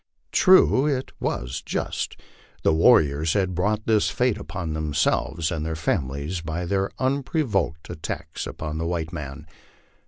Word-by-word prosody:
True, 185 -7 +5
it 135 -3 -1
was - - -2
just. - - -3 0.4
The - - +4
warriors 80 - +4
had 95 -2 +1
brought 105 +4 0
this 110 -2 +3
fate 125 -4 +1
upon 85 -3 -5
themselves 80 +1 0
and 80 -2 -2
their 80 0 -2
families 75 +1 -2
by 85 +2 -3
their 95 +2 0
unprovoked 130 - 0
at 80 - -8
tacks - - -5
upon 80 0 -5
the 85 - -1
white 85 -1 -2
man. 75 -1 -6
85 Hz, 145 wpm, -24 LUFS, 80-105 Hz, 0.4 s, True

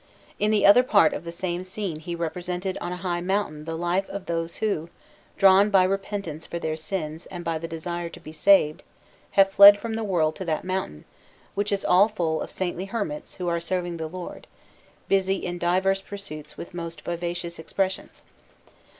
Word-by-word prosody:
In 210 - +2
the 215 -1 +3
other 205 +5 +8
part 200 -10 +4
of - - -6
the 170 - -5
same 175 +1 -3
scene 185 -4 -4
he 170 +2 -5
represented 180 +3 -3
on 175 - -3
a 180 - -4
high 175 -1 -1
mountain 180 -5 -2
the 165 0 -4
life 175 +3 0
of 195 -1 -6
those 165 0 -3
who, 185 -7 -1 0.5
drawn 195 +1 +6
by 195 -3 +5
repentance 195 -4 -3
for 170 - -4
their 160 -2 -2
sins 155 0 -5
and 175 -2 -8
by 165 -1 -1
the 165 - -5
desire 170 +1 -4
to - - -12
be 155 - -10
saved, 155 -1 +4 0.6
have 195 0 +6
fled 200 +1 +10
from 225 +2 -5
the 225 0 -2
world 165 -6 +1
to 190 - -5
that 155 -2 -1
mountain, 185 - -4 0.5
which 205 +1 -1
is 200 -1 -1
all 185 +3 +6
full 170 -7 -1
of - - -5
saintly 185 0 -3
hermits 195 -8 -4
who 180 - -4
are 170 -1 0
serving 175 0 -2
the 160 -1 -4
Lord, 180 +2 -8 0.6
busy 195 0 +2
in 175 -2 -4
diverse 190 +3 +2
pursuits 195 -7 -9
with 170 - -8
most 170 -2 -6
vivacious 170 0 -4
expressions. 190 +3 -3
175 Hz, 190 wpm, -25 LUFS, 165-195 Hz, 0.6 s, fled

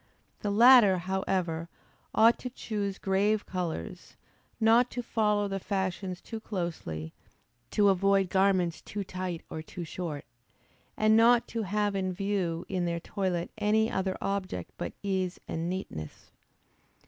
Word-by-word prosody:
The 205 - -2
latter, 225 -2 +7
however, 180 -2 -2 0.5
ought 230 +2 +5
to 250 - -5
choose 205 -5 -3
grave 200 +2 +1
colors, 170 - -5 0.4
not 230 +2 +5
to 245 - -4
follow 210 -3 +1
the 195 0 -3
fashions 190 -1 -3
too 225 - -7
closely; 165 - -4 0.6
to 205 -1 +3
avoid 195 0 +3
garments 190 -3 +2
too 205 -1 -5
tight 185 -3 -5
or 160 - -4
too 170 +2 -7
short, 160 -3 -5 0.7
and 215 0 +4
not 235 +1 +5
to 230 - -2
have 205 0 0
in 185 -1 -1
view 185 -3 -1
in 185 -2 -1
their 170 0 -1
toilet 180 -1 -2
any 215 +1 +2
other 190 0 -1
object 190 - -3
but 85 - -5
ease 190 -2 -1
and 165 +1 -3
neatness. 130 - -6
190 Hz, 135 wpm, -29 LUFS, 175-210 Hz, 0.7 s, latter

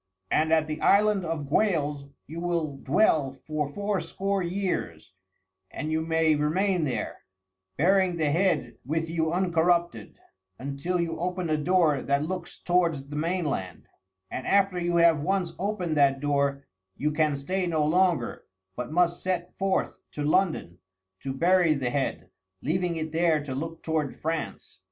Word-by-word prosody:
And 160 +1 +2
at 160 -1 +4
the 155 0 -5
Island 205 -1 +4
of 160 -3 -3
Gwales 150 -5 0 0.2
you 160 +3 -7
will 170 -5 -2
dwell 140 -3 +2
for 155 -2 -2
fourscore 200 +1 -2
years, 175 - -3 0.6
and 155 - -4
you 160 0 +1
may 160 -1 +2
remain 170 +4 +1
there, 120 -6 -3 0.6
bearing 185 +2 +3
the 155 -3 +1
head 170 -8 +1
with 160 +5 -1
you 160 -1 0
uncorrupted, 175 -1 +1 0.4
until 140 +7 -3
you 165 -1 -2
open 180 +1 -2
the 155 -2 +1
door 160 -3 +3
that 140 +2 0
looks 180 0 -5
towards 165 -6 0
the 145 - -6
mainland; 150 - -2 0.4
and 130 - -5
after 195 -2 +3
you 175 0 0
have 170 -2 +5
once 180 +2 -1
opened 185 -5 -1
that 135 -1 +4
door 140 -1 0 0.3
you 150 +1 0
can 150 -2 +1
stay 180 +6 -2
no 160 -3 +1
longer, 170 -5 +1 0.3
but 125 +3 -5
must 175 +1 +2
set 180 -1 -2
forth 195 -1 0
to 150 - -3
London 155 - +1 0.4
to 135 - -4
bury 170 +3 +3
the 130 -3 -2
head, 140 -2 -2 0.3
leaving 175 +4 0
it 160 -1 -4
there 160 -2 +2
to 140 -3 -5
look 165 +4 -5
toward 155 -3 -2
France." 160 -11 -4
160 Hz, 150 wpm, -27 LUFS, 145-180 Hz, 0.6 s, have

